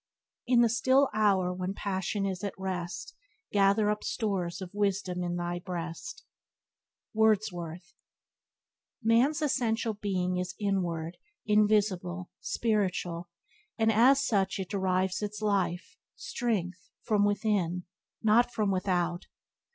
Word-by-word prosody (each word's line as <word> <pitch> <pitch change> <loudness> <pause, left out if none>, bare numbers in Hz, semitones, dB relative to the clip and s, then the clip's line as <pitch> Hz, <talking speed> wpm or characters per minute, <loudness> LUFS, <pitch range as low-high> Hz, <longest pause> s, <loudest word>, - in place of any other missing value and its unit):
"In 245 -1 +5
the 235 - +5
still 260 +4 +3
hour 195 -4 +2
when 185 +2 -3
passion 195 0 -2
is 190 0 -3
at 200 - -3
rest 180 -2 -4 0.4
Gather 205 +1 +3
up 210 - -3
stores 190 -6 -2
of 185 -1 -8
wisdom 195 -3 -1
in 175 0 -2
thy 175 0 -2
breast." 175 - -6 0.4
— - - -64
Wordsworth. 180 -6 0 1.1
AN'S 270 +8 +3
essential 230 -5 0
being 185 -3 -1
is 180 -1 -3
inward, 175 -5 -1 0.3
invisible, 205 -4 +1
spiritual, 180 -6 -1 0.5
and 225 -1 +3
as 265 +6 +5
such 195 -3 +1
it 190 -2 -5
derives 185 -1 0
its 210 0 -4
life, 195 -4 -1 0.2
strength, 185 -6 -3
from 210 -2 +2
within, 200 -4 0 0.4
not 225 +3 +4
from 210 -4 0
without. 180 -2 -1
195 Hz, 120 wpm, -29 LUFS, 180-215 Hz, 1.1 s, In